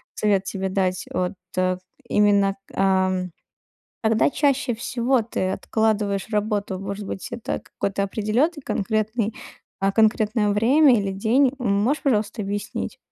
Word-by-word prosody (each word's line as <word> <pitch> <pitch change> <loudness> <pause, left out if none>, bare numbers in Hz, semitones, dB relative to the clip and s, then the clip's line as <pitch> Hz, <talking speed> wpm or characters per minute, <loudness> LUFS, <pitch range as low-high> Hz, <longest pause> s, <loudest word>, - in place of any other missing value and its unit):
совет 200 -2 +1
тебе 190 0 -3
дать. 185 -1 -1
Вот, 180 -1 -1 0.2
э, 185 0 +1 0.3
именно, 200 -1 +3 0.2
ам, 190 -1 +1 0.8
когда 220 +3 +3
чаще 275 -3 +1
всего 240 +2 0
ты 190 -4 -2
откладываешь 210 -2 0
работу? 210 -2 -1
Может 200 +1 -5
быть, 190 - -5
это 235 -1 -3
какой-то 200 0 -3
определенный 230 - 0
конкретный, 215 +1 -1 0.5
а, 195 0 +1
конкретное 215 0 +2
время 250 +7 +5
или 200 -1 -2
день? 245 +7 +2
М, 240 -5 0
можешь, 280 +7 0
пожалуйста, 220 -4 0
объяснить? 205 0 -4
210 Hz, 130 wpm, -23 LUFS, 195-235 Hz, 0.8 s, время